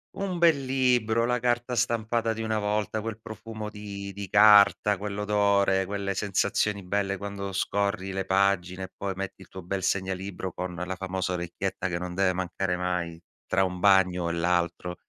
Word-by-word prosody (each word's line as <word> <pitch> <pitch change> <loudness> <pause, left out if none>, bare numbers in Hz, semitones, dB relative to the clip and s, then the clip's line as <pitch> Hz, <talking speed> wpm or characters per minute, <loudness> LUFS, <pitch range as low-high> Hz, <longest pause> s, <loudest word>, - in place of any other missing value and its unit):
un 185 -3 -3
bel 155 -6 +4
libro, 125 -4 +2
la 125 0 +1
carta 120 +1 0
stampata 115 -1 0
di 110 - -5
una 110 -1 -1
volta, 105 +1 -1
quel 110 0 -5
profumo 110 0 -7
di 100 -2 -7
di 100 -1 -7
carta, 105 -1 +6
quell'odore, 100 -1 +1
quelle 100 0 -3
sensazioni 100 +1 0
belle 100 +1 -1
quando 100 0 -5
scorri 100 0 -1
le 95 0 -2
pagine, 95 -1 +1
e 95 - -8
poi 100 -1 -3
metti 95 0 -6
il 95 - -13
tuo 95 - -8
bel 95 +2 -3
segnalibro 95 -1 -2
con 90 0 -4
la 90 +2 -4
famosa 95 -1 -3
orecchietta 90 +2 -3
che 85 -2 -2
non 90 0 -5
deve 95 -1 +2
mancare 90 0 -2
mai, 90 -2 -3 0.2
tra 95 +1 +2
un 90 -1 -2
bagno 90 -3 +4
e - - -2
l'altro. 85 +1 0
100 Hz, 170 wpm, -27 LUFS, 95-105 Hz, 0.2 s, carta